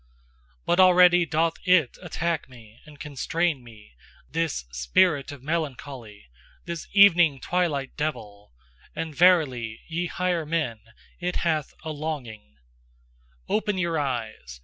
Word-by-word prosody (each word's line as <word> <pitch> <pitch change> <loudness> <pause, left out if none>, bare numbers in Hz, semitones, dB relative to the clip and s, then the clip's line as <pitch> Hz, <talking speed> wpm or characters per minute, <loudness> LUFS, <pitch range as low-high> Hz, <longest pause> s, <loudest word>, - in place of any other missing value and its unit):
But 175 - +1
already 180 -1 +6
doth 165 +2 0
IT 180 -8 +3
attack 170 -3 -3
me 115 -3 -16
and 150 -2 -15
constrain 150 0 -2
me, 110 - -16 0.4
this 160 - -2
spirit 140 - +1
of 140 -3 -11
melancholy, 135 - -5 0.4
this 170 -2 -6
evening 175 -8 +6
twilight 150 -4 -1
devil: 105 - -5 0.4
and 160 -1 -4
verily, 140 -10 +2
ye 170 +2 -2
higher 180 -1 -1
men, 150 -8 -2 0.4
it 180 0 -3
hath 155 -3 -1
a 160 - -4
longing 130 - -6 0.9
Open 210 -2 0
your 170 -3 0
eyes! 115 - -4
155 Hz, 120 wpm, -25 LUFS, 125-170 Hz, 0.9 s, already